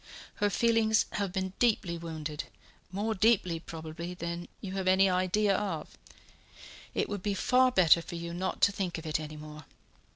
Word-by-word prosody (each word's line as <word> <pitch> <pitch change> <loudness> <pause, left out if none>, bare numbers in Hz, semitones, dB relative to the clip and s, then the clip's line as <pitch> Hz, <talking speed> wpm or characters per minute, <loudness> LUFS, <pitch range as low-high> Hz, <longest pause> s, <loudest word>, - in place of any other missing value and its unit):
Her 205 -1 +2
feelings 225 0 +3
have 200 -3 -2
been 190 0 -2
deeply 215 -7 +2
wounded 155 -3 -5 0.5
more 210 +4 -1
deeply, 190 -5 +2
probably, 165 +2 -7
than 170 0 -5
you 190 - -6
have 190 -1 -3
any 190 +1 +5
idea 185 +2 +2
of. 170 - -3 1.0
It - - +1
would 205 -2 -4
be 200 +1 -1
far 255 +5 +4
better 170 -6 +5
for 170 - -8
you 170 0 -5
not 185 +2 -3
to 200 - +6
think 190 -4 -3
of 165 - -8
it 155 -1 0
any 155 0 -7
more. 150 -1 -10
185 Hz, 170 wpm, -30 LUFS, 165-205 Hz, 1.0 s, to